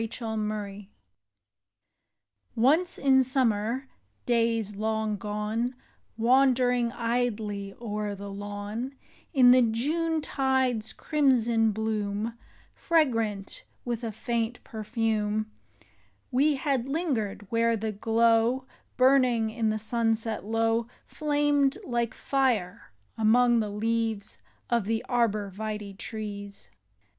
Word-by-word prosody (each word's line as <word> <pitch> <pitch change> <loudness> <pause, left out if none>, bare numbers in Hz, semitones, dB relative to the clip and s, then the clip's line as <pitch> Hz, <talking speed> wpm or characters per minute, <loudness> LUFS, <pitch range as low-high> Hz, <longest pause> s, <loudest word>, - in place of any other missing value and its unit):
73 225 +1 -5
ARBOR 215 -1 -2
VIT^. 200 0 -10 1.9
NCE 360 -1 -4
in 265 -1 +4
summer 250 -1 0 0.4
days 230 -3 +1
long 220 0 -1
gone, 210 +4 -2 0.4
Wandering, 250 0 +3
idly, 220 -4 -2
o'er 210 -3 -3
the 200 0 -8
lawn, 205 +6 -5 0.4
In 255 -5 +6
the 255 0 +7
Junetide's 265 -2 0
crimson 235 -7 +2
bloom, 215 +1 -2 0.4
Fragrant 230 - 0 0.2
with 240 -1 -3
a 225 - -2
faint 230 +2 -3
perfume, 215 -2 -2 0.8
We 285 +4 +3
had 270 -2 -1
lingered 260 - -2
where 230 0 +2
the 220 +1 -2
glow 230 +4 +2 0.3
Burning 255 -4 +4
in 225 -1 0
the 215 - 0
sunset 225 0 0
low 225 +2 +1 0.2
Flamed 290 -2 +1
like 235 -2 -1
fire 245 - -1 0.3
among 240 +2 +4
the 215 -2 -1
leaves 225 0 -2 0.3
Of 235 -4 +1
the 225 +1 -1
arbor 215 -5 0
vitae 210 0 -5
trees. 205 -1 -7
225 Hz, 100 wpm, -27 LUFS, 215-250 Hz, 1.9 s, the